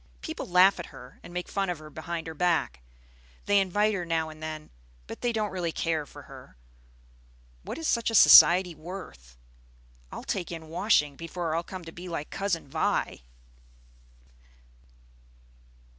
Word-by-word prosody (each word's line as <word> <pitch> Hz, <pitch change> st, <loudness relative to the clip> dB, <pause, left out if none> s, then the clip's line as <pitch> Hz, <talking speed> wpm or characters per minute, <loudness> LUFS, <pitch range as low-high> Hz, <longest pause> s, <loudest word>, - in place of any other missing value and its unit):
People 320 Hz, 0 st, -6 dB
laugh 185 Hz, +2 st, +5 dB
at 175 Hz, -, -6 dB
her 130 Hz, -2 st, -14 dB
and -, -, -12 dB
make 180 Hz, 0 st, -4 dB
fun 195 Hz, -2 st, -2 dB
of 175 Hz, -, -2 dB
her 155 Hz, 0 st, -12 dB
behind 165 Hz, +1 st, -5 dB
her 160 Hz, -, -6 dB
back. 160 Hz, -, 0 dB, 0.6 s
They 205 Hz, 0 st, +4 dB
invite 205 Hz, +3 st, +1 dB
her 185 Hz, -3 st, -2 dB
now 165 Hz, -2 st, -1 dB
and 155 Hz, 0 st, -13 dB
then, 155 Hz, -1 st, -7 dB, 0.3 s
but -, -, -9 dB
they 240 Hz, -, +1 dB
don't 215 Hz, -2 st, -2 dB
really 175 Hz, -3 st, -2 dB
care 160 Hz, -3 st, -2 dB
for -, -, -12 dB
her. -, -, -14 dB, 1.0 s
What -, -, -7 dB
is 325 Hz, -1 st, -3 dB
such 235 Hz, -1 st, +1 dB
a 225 Hz, -, -2 dB
society 180 Hz, -3 st, +8 dB
worth? 155 Hz, -, -10 dB, 0.7 s
I'll -, -, -7 dB
take 175 Hz, -3 st, -3 dB
in 160 Hz, -2 st, -8 dB
washing 160 Hz, -5 st, +2 dB
before 165 Hz, +1 st, -4 dB
I'll 165 Hz, -, 0 dB
come 180 Hz, 0 st, -9 dB
to 165 Hz, -, -9 dB
be 180 Hz, +2 st, -9 dB
like 160 Hz, -3 st, -5 dB
Cousin 195 Hz, -6 st, -2 dB
Vi!" 135 Hz, -, -1 dB
170 Hz, 160 wpm, -27 LUFS, 155-190 Hz, 1.0 s, society